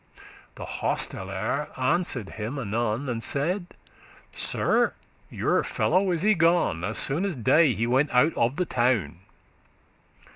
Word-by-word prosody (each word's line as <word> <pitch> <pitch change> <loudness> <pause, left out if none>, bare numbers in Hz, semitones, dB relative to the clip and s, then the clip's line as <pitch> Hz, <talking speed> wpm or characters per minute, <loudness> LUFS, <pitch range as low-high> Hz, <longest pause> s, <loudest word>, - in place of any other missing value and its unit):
The - - -7
hostelere 105 +10 -2
answered 130 - 0
him 115 +6 -5
anon, 115 +2 -2
And 115 -2 -3
saide, 175 +6 0 0.7
'Sir, - - +1 0.3
your - - 0
fellow 185 +3 +1
is 170 -1 -1
y 215 +1 +4
gone, 165 - +2
As 105 +4 -2
soon 150 +7 +1
as 195 -5 -2
day 135 +4 +3
he 115 +4 -1
went 130 +5 +2
out 135 +6 +3
of 120 +3 0
the 180 - -1
town. 120 - 0
130 Hz, 135 wpm, -25 LUFS, 115-165 Hz, 0.7 s, y